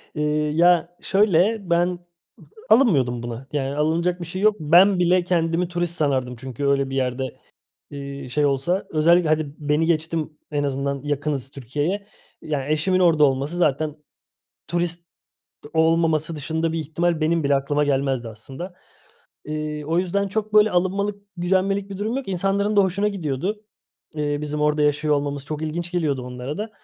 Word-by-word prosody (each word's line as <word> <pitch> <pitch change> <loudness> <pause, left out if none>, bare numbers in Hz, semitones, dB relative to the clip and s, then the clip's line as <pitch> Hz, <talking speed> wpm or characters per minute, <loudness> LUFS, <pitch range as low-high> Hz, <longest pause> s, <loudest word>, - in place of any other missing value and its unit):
Eee, 150 - -1 0.3
ya 175 +1 +3
şöyle, 200 +1 +2
ben 170 +1 +3
ı 180 -1 -4 0.7
alınmıyordum 130 - +4
buna. 120 +3 -6
Yani 140 -1 -1
alınacak 170 +4 0
bir - - -4
şey 185 +4 -5
yok. 215 0 +4
Ben 180 +5 +5
bile 180 0 +3
kendimi 170 0 0
turist 175 -1 -2
sanardım 130 -6 0
çünkü 130 +2 -5
öyle 140 -1 +2
bir 135 - -4
yerde, 130 -1 -2 0.5
eee, 140 -2 -7
şey 145 +3 +1
olsa. 140 +7 0
Özellikle 165 +1 +3
hadi 155 -2 0
beni 150 +2 +1
geçtim, 160 -1 -1
en 145 -1 0
azından 140 0 -2
yakınız 145 -2 -2
Türkiye'ye. 145 - -3 0.3
Yani 145 -2 -3
eşimin 185 +5 +1
orada 165 -4 +4
olması 140 +5 -1
zaten 155 -2 +1 0.7
turist 175 0 -1 0.7
olmaması 160 -1 +2
dışında 160 +2 -2
bir 165 - -2
ihtimal 165 +2 -1
benim 160 0 +1
bile 140 0 +3
aklıma 145 +2 +1
gelmezdi 135 -4 0
aslında. 135 - -8 0.7
Eee, 150 0 -4
o 165 +3 0
yüzden 195 +2 0
çok 215 +1 -3
böyle 210 0 +6
alınmalık, 200 +3 0
gücenmelik 195 +3 0
bir 195 - -6
durum 220 +5 -2
yok. 270 -6 -4
İnsanların 195 +3 0
da 200 - +7
hoşuna 195 +2 +1
gidiyordu, 195 +3 -3 0.5
eee, 145 -1 -1
bizim 150 0 -3
orada 150 0 +2
yaşıyor 150 +1 +2
olmamız 145 -1 -2
çok 155 0 -4
ilginç 170 +3 -3
geliyordu 150 -7 0
onlara 125 +5 -6
da. 215 +2 -4
160 Hz, 160 wpm, -23 LUFS, 145-180 Hz, 0.7 s, da